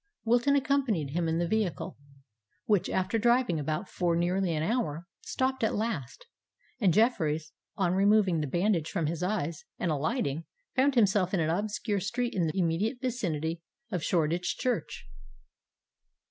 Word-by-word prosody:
Wilton 240 +5 +3
accompanied 265 - +1
him 170 +2 0
in 160 - 0
the 170 0 0
vehicle, 190 -7 -1 0.7
which, 205 -4 +2
after 190 +4 0
driving 235 -7 +3
about 155 +6 -2
for 175 -2 0
nearly 175 +2 +1
an 155 - -1
hour, 175 -6 -1 0.2
stopped 260 -1 -1
at 220 - +1
last; 210 - -3 0.5
and 195 -6 +4
Jeffreys, 160 -7 +1 0.3
on 180 -2 +1
removing 195 -3 +3
the 150 - -2
bandage 175 +1 +1
from 165 - -1
his 165 +2 -2
eyes, 175 -5 -2
and 170 - -1
alighting, 155 - -1 0.3
found 270 +1 +3
himself 200 -4 +3
in - - +1
an 160 0 +1
obscure 205 +2 -1
street 235 +5 -2
in 175 -4 +1
the 155 - -3
immediate 185 +8 0
vicinity 170 - -2 0.3
of 175 -4 -2
Shoreditch 170 +1 0
Church. 245 -10 -2
185 Hz, 150 wpm, -29 LUFS, 165-225 Hz, 0.7 s, and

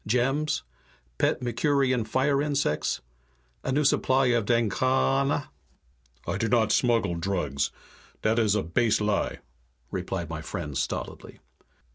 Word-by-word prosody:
Gems? 135 - +1 0.6
Pet 125 - +1
Mercurian 130 +1 +1
fire 135 +5 +1
insects? 145 - 0 0.6
A - - -1
new 145 +3 +2
supply 135 -1 +3
of 115 -3 +1
danghaana?" 130 +5 +1 0.8
"I 90 +4 -2
do 115 - +1
not 110 -1 +3
smuggle 115 -7 +2
drugs, 85 -6 -1 0.5
dat 110 +2 +2
is 105 -3 +3
a 105 - +1
base 110 +7 +2
lie," 105 -3 -1 0.5
replied 85 -3 -3
my 80 0 -5
friend 75 -3 -5
stolidly. - - -4
115 Hz, 120 wpm, -27 LUFS, 95-135 Hz, 0.8 s, supply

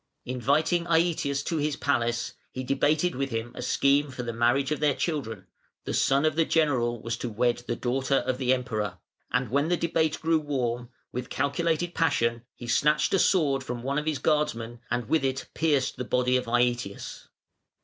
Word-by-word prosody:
Inviting 150 +8 +1
Aëtius 160 -4 +1
to 165 - -1
his 150 -1 0
palace, 120 -5 0 0.2
he 130 - -5
debated 150 +6 +1
with 135 +1 -2
him 115 0 -3
a - - -7
scheme 140 +1 +2
for 130 -2 -6
the 120 -1 -4
marriage 120 +4 +2
of 150 - 0
their 145 -3 +2
children 115 - -3 0.4
(the - - -4
son 140 +3 +3
of 155 -1 +2
the 165 - +4
general 130 -8 +1
was 115 +1 -3
to 120 - -4
wed 120 +2 +1
the 120 - -1
daughter 130 +3 0
of 130 0 0
the 130 -1 +1
Emperor), 110 -7 -1 0.3
and 125 -3 0
when 140 +3 +2
the 175 +1 +1
debate 160 -2 0
grew 160 0 +2
warm, 125 -5 -2 0.2
with 125 0 -5
calculated 165 +4 0
passion 115 -8 +1
he 120 - -9
snatched 150 +10 +2
a 195 - +4
sword 145 -9 +2
from 120 -2 -5
one 140 +3 0
of 150 - -6
his 155 -2 +1
guardsmen, 120 -7 0
and 120 -1 -1
with 160 +2 +2
it 135 0 -1
pierced 145 -4 +1
the 125 - -3
body 125 +1 +1
of 125 - +1
Aëtius. 120 -3 -1
135 Hz, 190 wpm, -27 LUFS, 120-150 Hz, 0.4 s, the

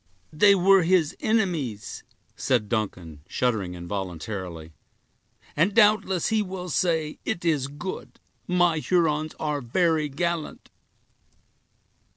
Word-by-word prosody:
"They 200 +6 +6
were 195 +1 +5
his 170 -3 +2
enemies," 170 - -1 0.3
said 120 -5 0
Duncan, 90 -9 -3
shuddering 105 -8 -1
involuntarily; 90 -2 -6 0.8
"and 185 +7 +2
doubtless, 205 -5 +3
he 220 -1 +2
will 185 -2 -5
say, 160 -2 0
it 170 - -3
is 150 -5 +1
good; 145 +7 -7 0.3
my 175 -3 +2
Hurons 155 -3 0
are 150 -2 -2
very 155 +4 +1
gallant." 170 +3 -3
155 Hz, 105 wpm, -25 LUFS, 115-180 Hz, 0.8 s, They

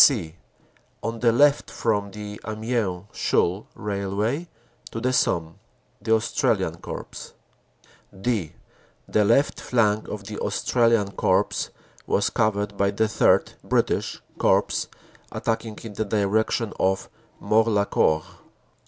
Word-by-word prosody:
"(c) 90 - +3 0.7
On 115 0 -3
the 120 0 +4
left 145 +5 +4
from 105 -3 0
the 105 +1 -8
Amiens 110 -4 -2
Chaulnes 95 +5 +1
Railway 105 - -2 0.4
to 115 - -5
the 125 +2 0
Somme 80 -8 0 0.4
The 110 - +3
Australian 110 - 0
Corps. - - -8 0.9
"(d) 105 -7 -1 0.5
The 105 - +3
left 140 +8 +2
flank 110 -3 +1
of 105 -2 -6
the 105 +1 -6
Australian 115 -4 +2
Corps - - +1 0.4
was - - +1
covered 105 -1 0
by 100 0 +3
the 100 +2 0
III 105 - +3
(British) - - 0 0.2
Corps - - +2 0.4
attacking 115 -1 -2
in 110 -2 -7
the 110 +2 -2
direc 105 +1 +1
tion 115 -3 -1
of 95 0 +1 0.3
Morlancourt. 105 -8 +2
105 Hz, 120 wpm, -24 LUFS, 100-115 Hz, 0.9 s, the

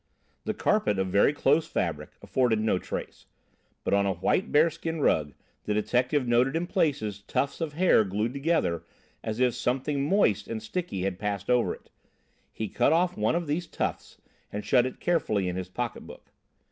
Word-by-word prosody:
The - - -2
carpet, 210 - +1
of 95 -1 0
very 100 +8 +4
close 145 +2 +2
fabric, - - -3
afforded 125 -4 +1
no 110 -4 +1
trace, - - -7 0.6
but - - 0
on 100 0 +3
a 95 - +1
white 185 - 0
bearskin 160 +1 +2
rug 75 - +1 0.3
the 105 - 0
detective 125 +5 +1
noted 125 +4 +3
in 170 +2 0
places 140 - -1
tufts 140 +10 -2
of 160 -3 -2
hair 175 -8 +4
glued 105 +4 -2
together 140 - 0 0.4
as 110 +1 -3
if 125 -2 +3
something 130 +4 -1
moist 110 - +2
and 115 - -3
sticky 140 - -3
had 95 -1 -2
passed 100 +1 -2
over 125 -1 +3
it. - - -23 0.6
He 110 - -4
cut - - +2
off 175 +2 +2
one 105 +8 +1
of 170 0 -1
these 165 +3 -2
tufts - - -4 0.3
and 105 0 -5
shut 125 +3 +4
it 130 - -8
carefully 110 - +1
in 90 - -2
his 95 0 -4
pocketbook. 120 +4 -6
125 Hz, 175 wpm, -27 LUFS, 105-155 Hz, 0.6 s, very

